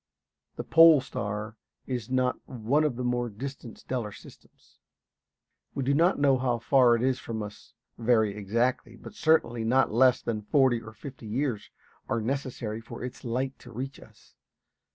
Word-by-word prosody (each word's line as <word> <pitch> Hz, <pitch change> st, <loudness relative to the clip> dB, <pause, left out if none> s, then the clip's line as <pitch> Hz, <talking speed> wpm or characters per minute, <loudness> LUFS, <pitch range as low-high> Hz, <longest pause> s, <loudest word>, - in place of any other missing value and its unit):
The -, -, -5 dB
pole 165 Hz, -2 st, +7 dB
star 110 Hz, -4 st, -5 dB, 0.3 s
is 125 Hz, -3 st, -4 dB
not 130 Hz, -1 st, +1 dB
one 130 Hz, +5 st, +1 dB
of 150 Hz, -5 st, 0 dB
the 125 Hz, -, -4 dB
more 120 Hz, -1 st, 0 dB
distant 125 Hz, +2 st, -8 dB
stellar 120 Hz, -5 st, -4 dB
systems. -, -, -17 dB, 1.0 s
We 135 Hz, -, -1 dB
do 135 Hz, +2 st, +1 dB
not 170 Hz, +6 st, +3 dB
know 140 Hz, -2 st, +3 dB
how 125 Hz, -2 st, 0 dB
far 120 Hz, +1 st, +4 dB
it 115 Hz, -, -2 dB
is 130 Hz, 0 st, +1 dB
from 110 Hz, -2 st, -5 dB
us 105 Hz, +1 st, -11 dB, 0.2 s
very 110 Hz, -3 st, +2 dB
exactly, 115 Hz, +3 st, -1 dB
but 115 Hz, -, -12 dB
certainly 155 Hz, -, +2 dB
not 130 Hz, +4 st, +2 dB
less 125 Hz, +1 st, +5 dB
than 110 Hz, -3 st, -3 dB
forty 125 Hz, +1 st, +2 dB
or 110 Hz, -1 st, -11 dB
fifty 125 Hz, 0 st, -10 dB
years 120 Hz, 0 st, -2 dB, 0.4 s
are 115 Hz, -, 0 dB
necessary 120 Hz, -3 st, -3 dB
for 115 Hz, +1 st, -9 dB
its 125 Hz, -, -7 dB
light 130 Hz, +3 st, -2 dB
to -, -, -13 dB
reach 135 Hz, +4 st, -6 dB
us. -, -, -19 dB
125 Hz, 165 wpm, -28 LUFS, 115-135 Hz, 1.0 s, pole